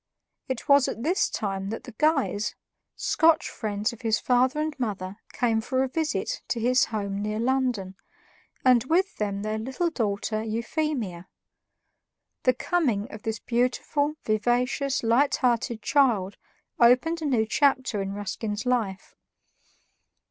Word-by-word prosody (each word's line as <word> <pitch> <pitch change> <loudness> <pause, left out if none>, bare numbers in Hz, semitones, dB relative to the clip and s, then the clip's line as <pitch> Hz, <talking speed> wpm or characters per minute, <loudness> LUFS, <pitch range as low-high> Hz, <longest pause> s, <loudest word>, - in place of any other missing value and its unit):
It 260 -3 -4
was 280 -2 +6
at 230 - -4
this 350 +6 +2
time 195 -2 -3
that 225 - -5
the 250 - -9
Guys, 275 -9 +1 0.4
Scotch 320 -2 +3
friends 210 +2 -2
of 235 - -12
his 220 -2 +1
father 255 +3 +2
and 310 0 -1
mother, 200 -5 -3
came 225 -2 +1
for 260 +3 0
a - - 0
visit 320 - -2
to 235 - -1
his 250 +2 +3
home 200 -2 -3
near 210 +1 -2
London, 245 -6 0 0.7
and 250 -3 +6
with 365 +7 +1
them 200 -1 -2
their 215 0 -2
little 265 +9 -2
daughter 215 -4 -1
Euphemia. 225 - -3 1.2
The 255 - +5
coming 250 - 0
of 215 - -8
this 220 0 -3
beautiful, 255 +6 0
vivacious, 245 +5 0
light 240 +5 +3
hearted 235 -3 0
child 225 -10 +2 0.4
opened 255 +8 +4
a - - -3
new 245 -6 +2
chapter 260 -3 +1
in 195 0 -3
Ruskin's 205 +1 -4
life. 220 -6 -1
240 Hz, 140 wpm, -26 LUFS, 215-270 Hz, 1.2 s, was